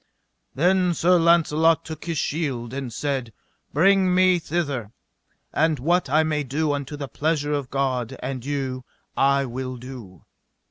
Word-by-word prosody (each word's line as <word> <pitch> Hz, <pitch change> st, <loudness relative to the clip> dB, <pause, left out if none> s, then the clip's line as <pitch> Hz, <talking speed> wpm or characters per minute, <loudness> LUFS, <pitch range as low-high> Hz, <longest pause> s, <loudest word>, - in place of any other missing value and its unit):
Then 180 Hz, +3 st, +2 dB
Sir 180 Hz, +2 st, +4 dB
Launcelot 165 Hz, -1 st, +3 dB
took 160 Hz, -1 st, -8 dB
his 165 Hz, -2 st, -2 dB
shield 135 Hz, -7 st, -2 dB
and 135 Hz, -3 st, -4 dB
said: 135 Hz, -2 st, -3 dB, 0.4 s
Bring 185 Hz, +3 st, +4 dB
me 185 Hz, -1 st, +4 dB
thither, 140 Hz, -10 st, -3 dB, 0.6 s
and 160 Hz, -1 st, +2 dB
what 170 Hz, +4 st, +1 dB
I 155 Hz, +3 st, +4 dB
may 155 Hz, -1 st, 0 dB
do 145 Hz, +3 st, -1 dB
unto 145 Hz, +1 st, -4 dB
the 140 Hz, -1 st, -5 dB
pleasure 150 Hz, +3 st, -1 dB
of 140 Hz, -3 st, -2 dB
God 130 Hz, -4 st, -1 dB
and 130 Hz, -1 st, -5 dB
you 135 Hz, -2 st, -3 dB, 0.3 s
I 140 Hz, 0 st, +3 dB
will 130 Hz, +1 st, -5 dB
do. 120 Hz, -8 st, -11 dB
145 Hz, 145 wpm, -23 LUFS, 130-165 Hz, 0.6 s, Sir